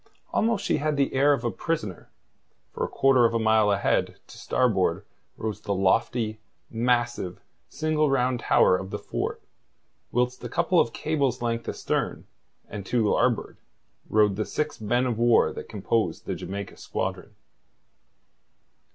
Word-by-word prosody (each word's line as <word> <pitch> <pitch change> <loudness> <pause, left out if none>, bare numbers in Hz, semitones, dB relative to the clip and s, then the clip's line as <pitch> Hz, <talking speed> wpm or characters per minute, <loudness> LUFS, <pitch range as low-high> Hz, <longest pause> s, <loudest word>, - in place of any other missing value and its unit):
Almost 230 +1 +1
she - - +2
had 150 0 -1
the 140 - +1
air 140 +2 +4
of 140 -4 +1
a 120 - 0
prisoner, 110 - -4 0.6
for - - -3
a - - 0
quarter 135 -2 +4
of 115 - +1
a - - +2
mile 110 -1 +3
ahead, 100 0 +1
to - - -14
starboard, - - +1 0.3
rose 105 -2 -4
the 100 - -2
lofty, 110 +3 +1 0.3
massive 120 -5 0 0.3
single 155 -1 0
round 130 -2 +1
tower 90 - +4
of 95 +1 -4
the - - -3
fort, - - -4 0.7
whilst 125 +1 0
a 120 - -4
couple 170 +6 +2
of 115 - +2
cables' 140 -6 -1
length 115 -1 -2
astern, - - -2 0.4
and 100 -1 -6
to 115 -3 +2
larboard, 120 +1 +1 0.5
rode 105 -2 +3
the 110 - -1
six 150 -5 -3
men 120 +4 +1
of 120 -3 -1
war 120 0 +4
that - - -8
composed 105 -3 -1
the - - -2
Jamaica 100 0 -6
squadron. - - -4
120 Hz, 150 wpm, -26 LUFS, 105-135 Hz, 0.7 s, air